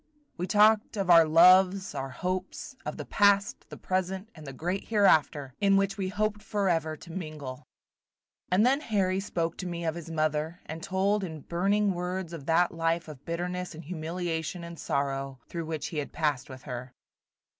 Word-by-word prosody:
We 180 - -3
talked 215 +1 +4
of 195 -3 +2
our 165 -2 +8
loves, 185 +4 +6
our 135 0 -4
hopes, 185 - -4
of - - -4
the - - -6
past, 200 -1 +2
the - - -9
present, 190 +2 -2
and 155 -3 -12
the - - -5
great 175 +8 -3
hereafter, 155 - +3
in 195 -1 +5
which 195 0 +1
we 195 -2 -2
hoped 210 +1 -1
forever 175 -7 0
to 170 - -12
mingle. 155 -7 -7 0.8
And 190 +5 +4
then 270 +3 +4
Harry 195 -7 0
spoke 170 -4 -2
to 185 - -5
me 170 -1 -4
of 160 - 0
his 170 -1 -8
mother, 155 +1 -1
and 160 +1 -7
told 195 +3 +1
in 160 -4 -6
burning 195 +6 +1
words 180 0 -4
of 145 -4 -8
that 170 +2 +3
life 165 0 -1
of 145 -3 -10
bitterness 180 +1 -3
and 160 - -9
humiliation 170 +1 -3
and 170 -2 -9
sorrow 135 -1 -2
through 165 -2 -5
which 160 -2 -3
he 155 - -3
had 145 - -5
passed 150 -5 -1
with 130 -1 -10
her. 125 0 -7
175 Hz, 180 wpm, -28 LUFS, 155-190 Hz, 0.8 s, our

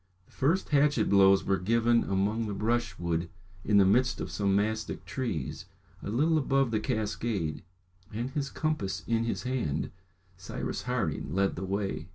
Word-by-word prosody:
The - - -27
first 165 +8 +1
hatchet 145 -3 +3
blows 100 -1 +6
were 95 -1 +1
given 115 +4 +3
among 105 +4 0
the 100 - -3
brushwood 95 -7 -1 0.3
in 105 0 +3
the 100 - +6
midst 125 +6 +3
of - - -4
some 100 -2 +1
mastick 110 +2 -1
trees, 105 - -4 0.4
a - - -5
little 155 +8 +2
above 135 -3 +1
the 110 - +1
cascade; 110 - -2 0.5
and 120 +5 -3
his 140 -2 -2
compass 105 - -2
in 115 0 +1
his 115 - -2
hand, 125 - -2 0.5
Cyrus 90 - -4
Harding 70 +6 -2
led 95 0 +1
the 90 - -5
way. 95 -3 -2
110 Hz, 160 wpm, -29 LUFS, 95-125 Hz, 0.5 s, blows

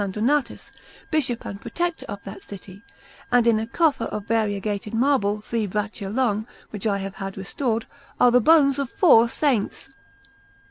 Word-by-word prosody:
Donatus, 230 +6 -1 0.4
Bishop 260 -7 -1
and 200 - -7
Protector 345 -1 -3
of 200 0 -7
that 195 +1 -9
city, 195 0 -11 0.5
and 245 -1 +4
in 230 -2 +4
a 220 - -3
coffer 285 -2 +1
of 210 -2 -5
variegated 210 -1 -1
marble, 225 -5 +1
three 220 0 -2
braccia 205 0 -4
long, 220 -2 0 0.2
which 210 0 -3
I 200 -2 +1
have 195 0 -6
had 195 -1 -6
restored, 225 +4 -2 0.3
are 245 - +6
the 250 +1 +5
bones 285 0 +5
of 275 -3 -2
four 235 - +5
Saints. 260 -4 -1
225 Hz, 155 wpm, -23 LUFS, 200-255 Hz, 0.5 s, are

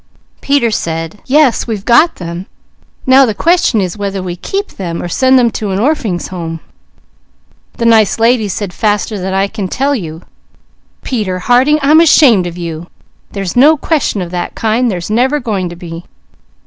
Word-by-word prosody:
"Peter 275 -5 +1
said, 165 -1 -4
'Yes, 275 -3 +2
we've 215 -4 -4
got 280 +8 +4
them; 175 +1 -7 0.6
now 260 +1 +6
the 220 -5 0
question 335 - +2
is 185 -3 -2
whether 200 -1 -3
we 175 -1 -4
keep 395 - -4
them, 170 -3 -6
or - - -4
send 260 +8 +3
them 240 -2 +3
to 210 -2 -4
an 190 - -1
Orphings' 220 - -1
Home.' 165 -3 -6 1.2
"The 230 - -2
nice 220 -4 +4
lady 230 0 +2
she - - -4
said 190 0 -4
faster 210 0 -1
than 190 +1 -3
I 195 +1 +2
can 200 -2 -5
tell 275 +8 -1
you: 165 - -5 0.8
'Peter 210 -8 -2
Harding, 250 +10 +3
I'm 305 +3 +5
ashamed 255 - +5
of 175 0 -8
you! 170 -1 -6 0.5
There's 195 -3 -4
no 295 +6 +5
question 280 - -1
of 170 - -8
that 175 -1 -4
kind! 230 +3 0
There's 180 -1 -4
never 260 +6 +1
going 205 -8 -3
to 175 - -9
be!' 170 -1 -9
210 Hz, 175 wpm, -13 LUFS, 180-255 Hz, 1.2 s, now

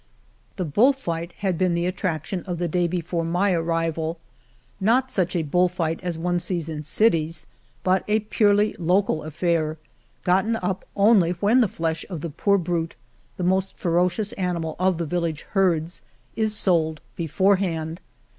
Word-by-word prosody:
The 185 - -2
bull 220 - +4
fight 170 -9 -4
had 185 -4 0
been 180 -2 +2
the 170 0 0
attraction 180 -1 -2
of 180 -3 -3
the 175 +1 -1
day 175 +1 +1
before 170 -1 -2
my 175 +4 +1
arrival, 165 -1 -1 0.6
not 245 +6 +2
such 180 -2 0
a 170 - +1
bull 180 +4 +2
fight 165 -2 -2
as 175 -3 -3
one 175 +1 0
sees 175 -2 -3
in 155 -2 -4
cities, 165 -2 +1 0.4
but 185 0 +2
a 215 +1 +2
purely 210 0 +2
local 180 -1 +2
affair 160 0 -1 0.5
gotten 190 +5 +2
up 190 -2 -3
only 200 -4 +4
when 210 +8 +3
the 230 - +4
flesh 165 -2 -2
of 170 -6 -5
the 170 - -4
poor 200 +6 +2
brute 170 -2 -2 0.2
— - - -34
^the 180 - 0
most 190 +1 0
ferocious 180 +4 0
animal 170 -4 -2
of 185 -1 +2
the 170 - -2
village 165 -1 -2
herds 175 -4 +1 0.2
— - - -37
is 215 -1 0
sold 160 -5 +1 0.2
beforehand. 170 -1 0
175 Hz, 165 wpm, -24 LUFS, 165-190 Hz, 0.6 s, bull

